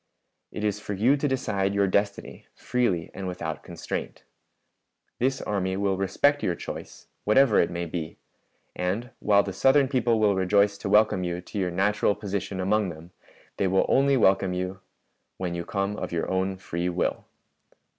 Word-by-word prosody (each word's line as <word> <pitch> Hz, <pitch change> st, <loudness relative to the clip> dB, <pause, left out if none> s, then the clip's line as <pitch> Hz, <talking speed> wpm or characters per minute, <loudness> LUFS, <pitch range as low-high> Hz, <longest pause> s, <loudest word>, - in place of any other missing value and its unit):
"It 105 Hz, -, -5 dB
is 105 Hz, -1 st, 0 dB
for 105 Hz, -, -5 dB
you 120 Hz, +8 st, +4 dB
to 145 Hz, +1 st, -1 dB
decide 100 Hz, -7 st, -1 dB
your 100 Hz, 0 st, +3 dB
destiny 100 Hz, +1 st, -2 dB
freely 110 Hz, -10 st, -1 dB
and 95 Hz, -1 st, -5 dB
without 90 Hz, -3 st, -4 dB
constraint. -, -, -6 dB, 1.0 s
This 130 Hz, +2 st, 0 dB
army 95 Hz, -2 st, -1 dB
will 100 Hz, -1 st, +1 dB
respect 100 Hz, +10 st, +2 dB
your 90 Hz, -, 0 dB
choice, -, -, -8 dB, 0.2 s
whatever 115 Hz, +1 st, +4 dB
it -, -, +3 dB
may 85 Hz, 0 st, -3 dB
be; 80 Hz, -1 st, -5 dB, 0.6 s
and 100 Hz, +7 st, -2 dB
while 100 Hz, -1 st, +4 dB
the 95 Hz, -, -5 dB
Southern 135 Hz, +4 st, +4 dB
people 120 Hz, -4 st, +1 dB
will 105 Hz, -2 st, +4 dB
rejoice 100 Hz, +2 st, +3 dB
to 100 Hz, -, -4 dB
welcome 105 Hz, -2 st, +4 dB
you 85 Hz, 0 st, -2 dB
to 100 Hz, +3 st, -6 dB
your 90 Hz, -2 st, 0 dB
natural 100 Hz, +3 st, +1 dB
position 100 Hz, -2 st, -4 dB
among 100 Hz, +1 st, +1 dB
them, 85 Hz, +1 st, -10 dB, 0.5 s
they 95 Hz, -, +1 dB
will 95 Hz, +1 st, +2 dB
only 135 Hz, 0 st, +3 dB
welcome 95 Hz, -4 st, +3 dB
you 90 Hz, +1 st, -3 dB, 0.6 s
when 90 Hz, -2 st, -3 dB
you 85 Hz, 0 st, -3 dB
come 100 Hz, +2 st, -2 dB
of -, -, -5 dB
your 85 Hz, -1 st, -1 dB
own 95 Hz, 0 st, 0 dB
free 90 Hz, -1 st, -3 dB
will. 90 Hz, 0 st, -1 dB
100 Hz, 170 wpm, -26 LUFS, 90-105 Hz, 1.0 s, you